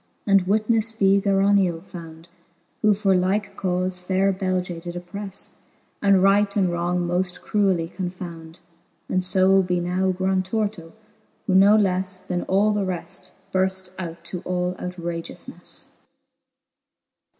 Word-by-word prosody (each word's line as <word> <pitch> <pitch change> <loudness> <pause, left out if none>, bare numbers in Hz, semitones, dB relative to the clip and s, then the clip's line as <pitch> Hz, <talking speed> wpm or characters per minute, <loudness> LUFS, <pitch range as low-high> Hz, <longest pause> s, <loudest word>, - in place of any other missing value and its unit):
And 195 -3 +3
witnefle 220 +2 +1
be 195 -1 +4
Gerioneo 195 -3 +2
found, 165 -3 -11 0.5
Who 210 -1 +4
for 195 -2 +2
like 195 +3 0
cauie 185 0 -1
faire 190 +2 +2
Beige 185 -1 -1
did 175 0 -7
opprefle. 195 +2 -7 0.5
And 195 -2 +4
right 200 +1 +3
and 185 -3 +2
wrong 175 +1 -1
moft 180 +1 -1
cruelly 190 -5 +1
confound: 175 -3 -7 0.5
And 185 0 0
fo 190 +1 +4
be 180 -1 0
now 180 +2 0
Grantorto,, 185 0 -1 0.5
who 190 - 0
no 200 +3 +7
lefle 185 -2 -1
Then 180 -2 -2
all 200 +3 +3
the 205 -1 0
reft 180 -1 -5 0.2
burft 190 0 0
out 170 -2 -6
to 175 +2 -6
all 180 0 -1
outragioufneffe. 170 -2 -7
185 Hz, 130 wpm, -23 LUFS, 180-195 Hz, 0.5 s, no